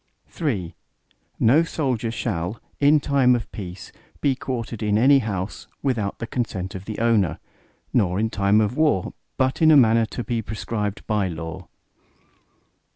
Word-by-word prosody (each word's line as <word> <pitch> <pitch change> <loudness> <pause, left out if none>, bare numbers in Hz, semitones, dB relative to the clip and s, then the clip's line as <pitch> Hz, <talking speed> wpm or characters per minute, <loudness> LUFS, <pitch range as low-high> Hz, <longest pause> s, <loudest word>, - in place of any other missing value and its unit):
III 100 - -1 0.7
No 130 +8 +5
soldier 130 -8 -1
shall, 100 -3 -3 0.2
in 150 +1 +5
time 135 -3 +3
of 115 - -5
peace 90 -3 -8 0.3
be 140 - +2
quartered 120 -3 -5
in 105 -1 +2
any 135 +5 +6
house, 100 -5 -4 0.2
without 115 -8 -1
the 115 - -4
consent 105 -6 -3
of 95 0 -7
the 110 0 -5
owner, 110 -7 +2 0.6
nor 95 -5 +2
in 110 +1 0
time 100 +1 +3
of 110 +3 0
war, 150 - +1 0.2
but 130 +3 0
in 160 - +6
a 155 - +8
manner 115 -3 +5
to 120 - -5
be 115 +1 -2
prescribed 105 0 -4
by 105 -3 0
law. 80 -1 -6
110 Hz, 155 wpm, -23 LUFS, 100-130 Hz, 0.7 s, a